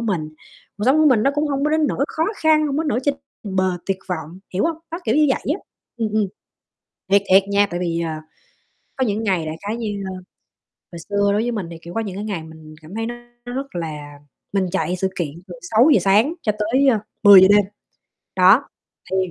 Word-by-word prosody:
mình. 185 -9 -2 0.5
Cuộc 210 - -2
sống 265 +4 +4
của 310 - +5
mình 245 -6 +4
nó 275 - +3
cũng 295 +1 0
hông 280 0 -1
có 300 - +1
đến 315 -1 +2
nỗi 275 - 0
khó 320 - -1
khăn, 310 -1 +3
hông 280 -1 -2
có 315 - +1
đến 320 - -3
nỗi 245 -3 0
trên 285 +1 +1 0.3
bờ 185 -3 -1
tuyệt 195 -1 -1
vọng, 165 -1 -5 0.2
hiểu 190 - +1
hông? 330 -1 0
Đó, 335 - -4
kiểu - - +1
như 305 0 +5
vậy 265 - 0
á, 390 - -8 0.4
ừm, 225 -2 -1
ừm. 215 -1 +2 0.9
Thiệt, 200 - +5
thiệt 190 +1 +7
nha. 200 0 +3
Tại 175 - -3
vì, 170 -2 -1
ờ, 165 -1 -2 0.8
có 260 - +1
những 210 +1 -1
ngày 185 -7 0
đại 155 +1 -4
khái 215 +2 -2
như, 210 -4 -4
ơ - - -6 0.8
hồi 170 - -8
xưa 200 0 +2
đối 210 - +1
với 240 +1 -1
mình 205 -7 -4
thì, 165 - -8
kiểu, 170 - -10
có - - -1
những 200 -4 -5
cái 205 - -5
ngày 195 -7 -4
mình 160 -1 -13
cảm 165 +7 -11
thấy 225 - -2
nó 240 +1 -4 0.3
rất 265 -1 -6
là 150 -4 -6 0.3
mình 195 -2 +1
chạy 185 -1 -1
sự 190 +1 -1
kiện 170 -4 -2 0.2
từ 180 - -9
6:00 230 - +4
sáng 205 - +3
cho 215 - +1
tới, 255 +6 +2
ơ, 230 -5 +4 0.2
10:00 195 -2 +9
đêm, 205 -1 +5 0.7
đó. 190 +9 +5 0.4
Thì 190 - 0
205 Hz, 230 wpm, -21 LUFS, 180-255 Hz, 0.9 s, 10:00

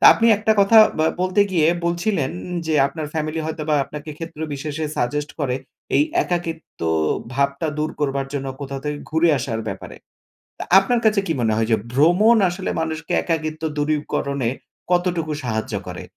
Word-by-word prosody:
তা - - +1
আপনি 230 - +2
একটা 220 +1 +3
কথা 220 +3 +6 0.2
ব্যা 160 - +3
বলতে 185 +2 +2
গিয়ে 165 -4 +3 0.2
বলছিলেন, 170 -4 0 0.4
যে 160 - 0
আপনার 150 +2 -5
ফ্যামিলি 155 0 -2
হয়তোবা 155 -1 -2
আপনাকে 150 +2 -8
ক্ষেত্র 165 -2 -8
বিশেষে 150 +2 -4
সাজেস্ট 145 +4 -1
করে, 130 -3 0 0.4
এই - - +5 0.2
একাকিত্ব 170 -2 -4 0.5
ভাবটা 140 +3 0
দূর 155 +1 0
করবার 140 -2 0
জন্য, 135 -1 -3
কোথাও 135 -1 -5
থেকে 150 0 -2
ঘুরে 160 +2 +3
আসার 115 -3 -3
ব্যাপারে। 95 - -7 0.6
তা - - -4
আপনার 235 +5 +2
কাছে 215 -2 +4
কি 165 - +1
মনে 110 -2 +2
হয়? 110 0 +1
যে - - +6 0.2
ভ্রমণ 175 - +5
আসলে 185 +2 -4
মানুষকে 160 0 -3
একাকিত্ব 155 -1 -2
দূরীকরণে 145 -4 -1 0.4
কতটুকু 175 -3 +1
সাহায্য 110 -2 -2
করে? - - -6
155 Hz, 160 wpm, -21 LUFS, 140-170 Hz, 0.6 s, কথা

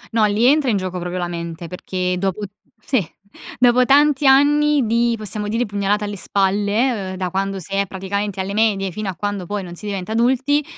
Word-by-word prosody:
No, 220 - +4
lì 210 +3 +1
entra 285 0 +4
in 210 - +2
gioco 185 -1 -4
proprio 180 +1 -4
la 175 -1 -2
mente, 170 -1 -6
perché 180 +1 -3
dopo 195 +1 -2 0.4
sì, 260 -6 +2 0.6
dopo 250 0 +5
tanti 285 0 +4
anni 290 0 +4
di, 235 +1 +2
possiamo 210 0 -5
dire, 230 +3 0
pugnalata 205 +1 -1
alle 205 -1 -5
spalle, 205 +2 0
ehm, - - -6
da 180 -2 -3
quando 195 0 -2
si 190 +3 -8
è 200 -1 +1
praticamente 195 +1 -4
alle 195 +1 -3
medie, 205 -3 +1
fino 205 +2 -4
a 185 - -5
quando 205 -1 -3
poi 205 0 -3
non 175 -1 -8
si 210 - -10
diventa 195 0 -4
adulti, 265 +6 +2
205 Hz, 200 wpm, -20 LUFS, 190-240 Hz, 0.6 s, dopo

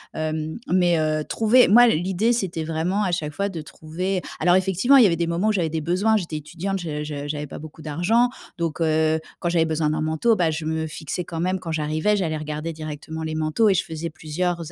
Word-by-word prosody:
Hem, 155 0 -3
mais, 175 -2 +3
heu, 155 0 0
trouver 225 +8 +4
moi 240 +4 +8
l'idée, 190 +5 +1
c'était 180 -8 -2
vraiment 165 +6 -1
à 185 - 0
chaque 155 -3 -2
fois 200 +7 -2
de 175 -5 -5
trouver 180 +5 -4 0.2
alors 175 +2 +5
effectivement, 190 +8 +4
il 255 - +8
y - - +7
avait 170 - +1
des 170 0 -1
moments 170 +6 +1
où - - +4
j'avais 175 -5 0
des 160 +1 -2
besoins. 185 +8 +2
J'étais 165 -6 -4
étudiante, 175 +6 -4
je 150 -4 -4
je 145 -1 -5
j'avais 150 0 -3
pas - - -8
beaucoup 155 +1 -11
d'argent. 180 +11 +2 0.3
Donc, 165 -1 -3
heu, 160 0 +2 0.2
quand - - -2
j'avais 170 -1 +2
besoin 155 -1 0
d'un 155 0 -1
manteau, 160 +9 +2
bah, 170 -5 +1
je 155 0 -4
me 160 0 -1
fixais 155 +3 -5
quand 165 -1 -6
même 185 +2 0
quand 170 -2 -6
j'arrivais. 155 +6 0
J'allais 165 -5 -1
regarder 155 +2 -4
directement 155 +1 -6
les 155 0 -3
manteaux 155 +8 +2
et - - +4
je - - +1
faisais 160 +1 -5
plusieurs 165 +2 -3
165 Hz, 230 wpm, -23 LUFS, 155-185 Hz, 0.3 s, moi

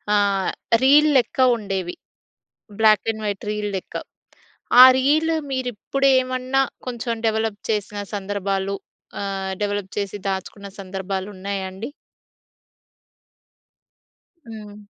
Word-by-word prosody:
ఆహ్, 200 -2 +2 0.3
రీల్ 295 +3 +6
లెక్క 250 - 0 0.2
ఉండేవి. 195 -4 -4 0.8
బ్లాక్ 215 -1 +5
అండ్ 220 0 -8
వైట్ 205 -1 -3
రీల్ 210 0 -2
లెక్క. 185 - -10 0.9
ఆ - - +14
రీలు 310 +5 +2 0.2
మీరిప్పుడేమన్నా 260 +1 +1 0.2
కొంచెం 235 -1 -3
డెవలప్ 220 -1 0
చేసిన 210 -1 -2 0.2
సందర్భాలు 200 -1 -2 0.5
ఆహ్, 195 -1 -3
డెవలప్ 205 -2 -2
చేసి 200 0 -3
దాచుకున్న 195 +1 -5
సందర్భాలున్నాయా 195 0 -4
అండి? 200 +6 -6 2.6
హ్మ్. 210 -2 -10
205 Hz, 90 wpm, -22 LUFS, 195-240 Hz, 2.6 s, ఆ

